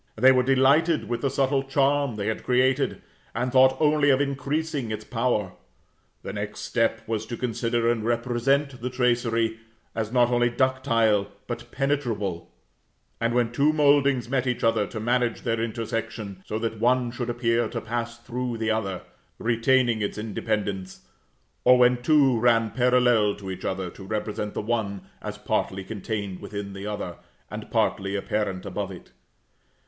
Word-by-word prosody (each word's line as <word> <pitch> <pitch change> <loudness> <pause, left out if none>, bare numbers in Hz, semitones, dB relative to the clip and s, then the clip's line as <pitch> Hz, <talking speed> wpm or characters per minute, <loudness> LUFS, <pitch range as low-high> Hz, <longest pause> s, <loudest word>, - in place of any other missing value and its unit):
They 130 +4 +6
were 130 -1 +4
delighted 135 +5 +3
with 120 0 -2
the 140 - +1
subtle 135 0 +1
charm 140 -1 +1
they 100 -1 -3
had 110 0 -2
created, 130 +2 +1 0.3
and 125 +2 -1
thought 130 0 +5
only 150 -1 +3
of 135 -1 +4
increasing 140 -1 -2
its 110 0 -4
power. 115 -5 0 0.7
The - - -5
next 105 0 -5
step 115 -1 0
was 110 -1 -1
to 120 - -5
consider 120 -1 -1
and 115 -2 +1
represent 125 +3 0
the 125 - -2
tracery, 120 -3 +1 0.3
as 110 -1 -3
not 120 -1 +4
only 120 0 +3
ductile, 115 -5 +2 0.2
but - - -6
penetrable; 115 -11 -2 0.7
and 115 +1 0
when 120 -2 +2
two 140 +5 +3
mouldings 140 -4 +3
met 130 0 0
each 125 - -1
other, 115 -3 +2
to 110 - -6
manage 120 +1 0
their 115 -1 0
intersection, 115 -3 -4
so 110 - -2
that 115 -1 -3
one 125 +1 +2
should 120 0 -4
appear 120 -1 +1
to 115 +1 -4
pass 115 +1 -4
through 120 0 -4
the 110 0 0
other, 100 -4 -2 0.3
retaining 120 0 +2
its 100 - -2
independence; 105 -3 -3 0.6
or 125 - +7
when 125 0 +4
two 135 -3 +4
ran 115 -2 +3
parallel 125 -4 +3
to 95 -2 -7
each 95 0 -7
other, 95 -2 -2
to 95 - -12
represent 105 +1 -3
the - - -1
one 105 -4 -2 0.2
as - - -6
partly 95 0 -2
contained 100 -2 -4
within 100 -1 -6
the 100 +1 -6
other, 100 -5 -4 0.3
and - - -7
partly 100 +1 0
apparent 100 -1 -2
above 100 0 -3
it. 90 - -12
115 Hz, 160 wpm, -25 LUFS, 110-130 Hz, 0.7 s, or